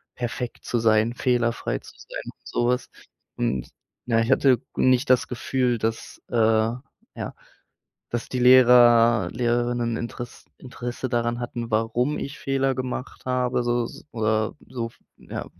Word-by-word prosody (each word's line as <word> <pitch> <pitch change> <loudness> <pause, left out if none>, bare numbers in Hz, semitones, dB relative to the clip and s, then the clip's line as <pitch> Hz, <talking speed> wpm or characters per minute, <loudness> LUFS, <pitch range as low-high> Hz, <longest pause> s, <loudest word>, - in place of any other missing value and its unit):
perfekt 120 0 -5
zu 120 - 0
sein, 110 +1 +3
fehlerfrei 120 -2 0
zu - - -15
sein - - -8
und - - -12
so 120 - 0
was. 125 +1 0 0.5
Und 65 -2 -1 0.4
na, 115 -1 +3
ich 115 +3 0
hatte 135 -2 +5
g - - -34
nicht 130 +1 +3
das 125 - +3
Gefühl, 125 -1 0
dass, 110 +1 -3
äh, - - -3
ja, 115 +4 -1 0.7
dass 120 -1 -3
die 130 - -2
Lehrer, 120 -5 +6
Lehrerinnen 120 -1 0
Interess 120 0 -7
Interesse 125 0 -5
daran 120 0 0
hatten, 120 -1 -5
warum 115 +6 0
ich 140 - -6
Fehler 135 -1 0
gemacht 130 0 -5
habe, 125 -1 0
so 120 0 +1
s - - -10
oder 110 -1 0
so, 115 -3 -4 0.3
ja, - - -7
120 Hz, 145 wpm, -24 LUFS, 115-125 Hz, 0.7 s, Lehrer